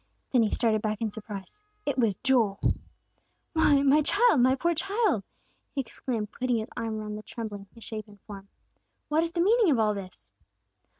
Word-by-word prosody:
Then 250 Hz, -, +5 dB
he 220 Hz, -, +2 dB
started 220 Hz, -2 st, +1 dB
back 215 Hz, -1 st, -2 dB
in 225 Hz, -2 st, -1 dB
surprise. 205 Hz, -3 st, -8 dB, 0.3 s
It 285 Hz, -, 0 dB
was 230 Hz, -6 st, +2 dB
Joel! 230 Hz, -7 st, +3 dB, 0.9 s
"Why, 295 Hz, -4 st, +4 dB
my 285 Hz, +2 st, +5 dB
child! 405 Hz, -, +4 dB
My 260 Hz, +2 st, +5 dB
poor 340 Hz, +6 st, +1 dB
child!" 395 Hz, +7 st, 0 dB, 0.5 s
he 275 Hz, -, +1 dB
exclaimed, 225 Hz, -3 st, -4 dB
putting 250 Hz, -1 st, -1 dB
his 220 Hz, 0 st, -4 dB
arm 220 Hz, -1 st, -3 dB
around 210 Hz, 0 st, -5 dB
the -, -, -7 dB
trembling, 210 Hz, -3 st, -7 dB
misshapen 215 Hz, -2 st, -8 dB
form. 200 Hz, -2 st, -10 dB, 0.6 s
"What 310 Hz, +2 st, +3 dB
is 335 Hz, -, -2 dB
the 340 Hz, -, +1 dB
meaning 435 Hz, +2 st, +4 dB
of 275 Hz, -, +4 dB
all 215 Hz, -1 st, +3 dB
this?" 195 Hz, -2 st, -8 dB
230 Hz, 175 wpm, -28 LUFS, 210-285 Hz, 0.9 s, Then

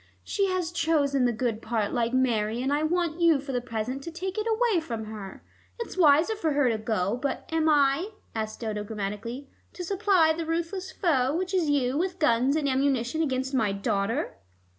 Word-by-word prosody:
She 395 Hz, -1 st, 0 dB
has 365 Hz, -3 st, -1 dB
chosen 285 Hz, -6 st, +2 dB
the 245 Hz, -, +3 dB
good 230 Hz, -1 st, -2 dB
part 220 Hz, -2 st, -1 dB
like 235 Hz, -1 st, 0 dB
Mary, 235 Hz, -3 st, +1 dB
and 265 Hz, +3 st, 0 dB
I 295 Hz, -, +1 dB
want 340 Hz, +1 st, 0 dB
you 330 Hz, -4 st, +5 dB
for 275 Hz, 0 st, -6 dB
the 245 Hz, -1 st, -1 dB
present 240 Hz, +2 st, -4 dB
to 335 Hz, -, -7 dB
take 370 Hz, +3 st, -4 dB
it 430 Hz, -, -2 dB
away 445 Hz, -4 st, +2 dB
from 230 Hz, -8 st, -5 dB
her. 210 Hz, -3 st, -8 dB, 0.3 s
It's 465 Hz, -, -6 dB
wiser 325 Hz, +4 st, +4 dB
for 325 Hz, -8 st, -1 dB
her 285 Hz, -3 st, +3 dB
to 225 Hz, -2 st, -1 dB
go, 215 Hz, -2 st, 0 dB
but 280 Hz, -, -3 dB
am 320 Hz, -1 st, +2 dB
I," 290 Hz, +5 st, +3 dB, 0.2 s
asked 220 Hz, 0 st, -4 dB
Dodo 215 Hz, -2 st, -3 dB
grammatically, 220 Hz, +5 st, -5 dB, 0.3 s
"to 360 Hz, -, -6 dB
supply 370 Hz, -3 st, +3 dB
the 325 Hz, -1 st, -4 dB
ruthless 340 Hz, +3 st, -2 dB
foe, 280 Hz, -6 st, +1 dB
which 365 Hz, +2 st, -2 dB
is 350 Hz, -5 st, +2 dB
you, 275 Hz, -1 st, +1 dB
with 365 Hz, +1 st, -1 dB
guns 270 Hz, -3 st, +3 dB
and 305 Hz, -2 st, 0 dB
ammunition 265 Hz, +1 st, +1 dB
against 265 Hz, -3 st, -1 dB
my 220 Hz, -6 st, +1 dB
daughter?" 200 Hz, -, -1 dB
275 Hz, 195 wpm, -27 LUFS, 230-335 Hz, 0.3 s, you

